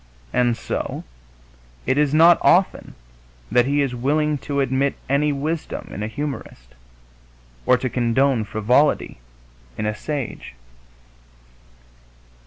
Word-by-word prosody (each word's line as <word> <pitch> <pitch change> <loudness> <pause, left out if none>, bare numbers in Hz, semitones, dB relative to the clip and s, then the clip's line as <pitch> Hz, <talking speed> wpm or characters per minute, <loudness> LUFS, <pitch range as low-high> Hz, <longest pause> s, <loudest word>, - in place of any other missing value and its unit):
And 120 -2 +2
so - - -4 0.8
it - - +1
is 145 -1 +2
not 165 +3 +6
often 185 +2 +2 0.6
that 120 +2 +3
he 145 +1 +2
is 135 -3 -2
willing 145 +4 0
to 140 0 -3
admit 135 +1 +1
any 145 +2 +2
wisdom 150 +3 -4
in 100 - -6
a 105 - -2
humorist, 110 - -6 0.9
or 125 - +5
to 130 - -2
condone 125 0 +1
frivolity 110 - +1 0.6
in - - -2
a 105 - 0
sage. 135 - -5
135 Hz, 115 wpm, -22 LUFS, 120-150 Hz, 0.9 s, not